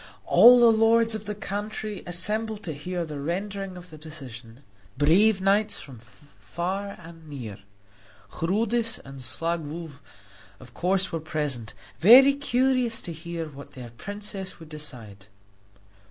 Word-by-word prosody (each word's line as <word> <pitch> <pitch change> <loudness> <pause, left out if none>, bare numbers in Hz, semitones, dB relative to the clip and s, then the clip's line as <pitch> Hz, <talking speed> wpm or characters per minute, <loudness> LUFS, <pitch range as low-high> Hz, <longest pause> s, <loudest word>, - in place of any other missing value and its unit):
All 245 +1 +8
the 235 -1 +7
lords 225 +1 +4
of 215 -1 -4
the 210 - -4
country 210 0 -5
assembled 210 +4 0
to 160 - -4
hear 175 +4 -4
the 150 -2 -6
rendering 190 +4 -4
of 180 -1 -11
the 155 - -11
decision 130 -5 -10 0.3
brave 190 +8 +4
knights 200 +2 +2
from 130 -5 -11
far 150 - -6
and 165 -2 -13
near. 115 -9 -7 0.7
Chrudis 225 +6 0
and 135 -1 -10
Staglow, 165 +4 -3 0.7
of 130 - -15
course, 190 +2 0
were 165 - -2
present, 145 -8 -3 0.2
very 260 +9 +8
curious 255 -3 +1
to 170 - -6
hear 165 +1 -5
what 140 -1 -12
their 125 -3 -9
princess 200 - -6
would 160 -2 -12
decide. 115 -10 -8
170 Hz, 135 wpm, -26 LUFS, 145-210 Hz, 0.7 s, All